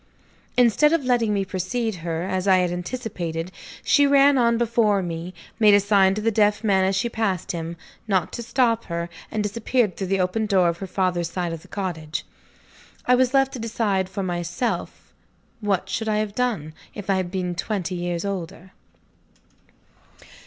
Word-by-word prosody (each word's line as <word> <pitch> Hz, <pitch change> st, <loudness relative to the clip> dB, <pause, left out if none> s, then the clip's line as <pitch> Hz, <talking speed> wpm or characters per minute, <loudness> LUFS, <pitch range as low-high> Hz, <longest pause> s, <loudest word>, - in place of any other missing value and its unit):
Instead 250 Hz, +6 st, +4 dB
of 320 Hz, -5 st, +1 dB
letting 240 Hz, -4 st, +2 dB
me 200 Hz, -1 st, 0 dB
precede 205 Hz, +5 st, -2 dB
her, 165 Hz, 0 st, -3 dB
as 185 Hz, +1 st, -2 dB
I 190 Hz, -1 st, +6 dB
had 180 Hz, -1 st, +1 dB
anticipated, 175 Hz, -4 st, -4 dB, 0.3 s
she 285 Hz, -1 st, +4 dB
ran 280 Hz, 0 st, +5 dB
on 235 Hz, -2 st, +3 dB
before 225 Hz, -4 st, +2 dB
me 170 Hz, +1 st, -5 dB, 0.3 s
made 210 Hz, -2 st, +7 dB
a -, -, +6 dB
sign 195 Hz, -1 st, +3 dB
to 215 Hz, -, -3 dB
the 225 Hz, +1 st, +1 dB
deaf 210 Hz, 0 st, +2 dB
man, 195 Hz, -3 st, +3 dB
as 190 Hz, +1 st, +1 dB
she 195 Hz, +5 st, +1 dB
passed 220 Hz, -6 st, -1 dB
him, 170 Hz, 0 st, -5 dB, 0.3 s
not 190 Hz, -6 st, 0 dB
to -, -, -4 dB
stop 235 Hz, -1 st, +1 dB
her 170 Hz, 0 st, -3 dB, 0.2 s
and 215 Hz, -, -2 dB
disappeared 220 Hz, 0 st, 0 dB
through 190 Hz, -, -4 dB
the 195 Hz, +1 st, +1 dB
open 200 Hz, +4 st, 0 dB
door 185 Hz, -4 st, +3 dB
of 170 Hz, 0 st, -4 dB
her 195 Hz, -, -5 dB
father's 180 Hz, -2 st, 0 dB
side 175 Hz, -1 st, -3 dB
of 165 Hz, -, -7 dB
the -, -, -17 dB
cottage. 165 Hz, -6 st, -4 dB, 0.8 s
I 250 Hz, -, +4 dB
was 255 Hz, +1 st, +3 dB
left 270 Hz, 0 st, +3 dB
to 255 Hz, -, -5 dB
decide 210 Hz, -4 st, -1 dB
for 190 Hz, +1 st, -4 dB
myself. 175 Hz, +6 st, -3 dB, 0.5 s
What 195 Hz, -3 st, 0 dB
should 220 Hz, +3 st, -2 dB
I 210 Hz, -, +1 dB
have 215 Hz, -1 st, -2 dB
done, 215 Hz, -11 st, -1 dB, 0.2 s
if 205 Hz, -, -7 dB
I 195 Hz, -1 st, +2 dB
had 185 Hz, -2 st, -2 dB
been 180 Hz, -1 st, -2 dB
twenty 185 Hz, +1 st, -3 dB
years 175 Hz, 0 st, -3 dB
older? 185 Hz, -1 st, -5 dB
195 Hz, 180 wpm, -23 LUFS, 180-225 Hz, 0.8 s, made